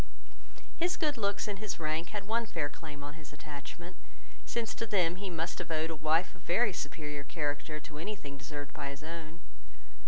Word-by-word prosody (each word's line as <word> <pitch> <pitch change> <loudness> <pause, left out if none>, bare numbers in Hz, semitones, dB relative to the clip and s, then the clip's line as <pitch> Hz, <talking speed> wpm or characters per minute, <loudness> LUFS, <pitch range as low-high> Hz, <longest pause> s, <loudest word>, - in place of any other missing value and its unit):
His 345 +1 +3
good 300 -3 +3
looks 200 -3 +2
and 200 -2 -1
his 210 -3 -1
rank 155 +1 +1
had 205 -2 -2
one 230 +2 +3
fair 155 -6 +1
claim 145 -1 -7
on 145 +1 -4
his 155 -2 -10
attachment; 150 +4 -6 0.5
since 235 -2 +1
to 230 - -1
them 180 -4 +4
he 195 0 -2
must 165 -1 0
have - - -3
owed 160 0 +2
a - - -1
wife 155 +3 +4
of 180 - -15
very 205 +5 +5
superior 150 -2 -2
character 150 +1 0
to 150 0 -7
any 210 +6 -1
thing 140 -7 -6
deserved 145 0 -5
by 140 - -2
his 140 +2 -6
own. 165 0 -5
160 Hz, 195 wpm, -34 LUFS, 150-195 Hz, 0.5 s, very